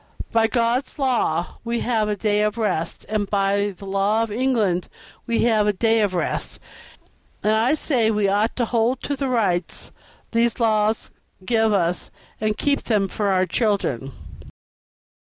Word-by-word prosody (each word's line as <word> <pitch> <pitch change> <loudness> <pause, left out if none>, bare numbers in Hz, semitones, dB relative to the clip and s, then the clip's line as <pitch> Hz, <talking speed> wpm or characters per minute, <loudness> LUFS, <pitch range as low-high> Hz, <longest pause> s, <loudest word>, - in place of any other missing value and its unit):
By 225 -1 +3
God's 240 +3 0
law 240 - 0
we 235 0 -2
have 220 -3 0
a 210 - 0
day 210 0 +1
of 210 +1 0
rest, 190 -7 -2
and 210 -2 -1
by 200 0 +1
the 200 - -10
law 200 +3 +1
of 225 - -4
England 215 -7 0 0.4
we 235 -1 +1
have 220 -3 +3
a 210 - +3
day 225 +3 +2
of 200 -3 0
rest; 175 - -2 0.9
and 215 - +3
I 230 +7 +3
say 250 -7 +1
we 210 -2 +1
ought 205 +3 +1
to 240 - 0
hold 235 +2 0
to 285 - -2
the 275 -1 -2
rights 190 -8 -1 0.4
these 230 0 +1
laws 215 -1 +1 0.3
give 225 0 +2
us 175 -3 0 0.3
and 215 0 -1
keep 285 -1 0
them 210 -4 +1
for 205 +2 -2
our 185 -1 +2
children." 180 - -1
215 Hz, 160 wpm, -22 LUFS, 200-235 Hz, 0.9 s, By